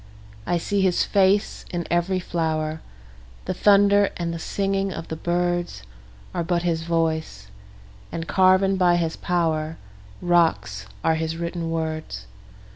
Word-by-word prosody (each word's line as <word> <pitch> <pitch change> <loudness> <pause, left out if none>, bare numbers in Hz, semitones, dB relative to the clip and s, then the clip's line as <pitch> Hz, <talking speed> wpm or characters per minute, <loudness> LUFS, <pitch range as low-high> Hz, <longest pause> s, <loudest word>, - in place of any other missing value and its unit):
I 175 - +2
see 200 +4 -1
his 185 -2 +3
face 200 +1 +2
in 175 -1 -3
every 175 +2 +1
flower; 160 -3 -2 0.6
The - - -1
thunder 200 0 +5
and 170 -1 -2
the 165 - -5
singing 195 +2 -1
of 165 - -7
the 160 - -3
birdsAre 170 - -3
but 175 -1 +1
his 165 -2 0
voice—and 160 -5 -4
carven 190 +1 +4
by 180 -2 +4
his 165 -2 -1
powerRocks 155 - -1 0.2
are 160 - +3
his 160 0 -3
written 170 0 -3
words. 155 - -4
170 Hz, 120 wpm, -23 LUFS, 160-180 Hz, 0.6 s, thunder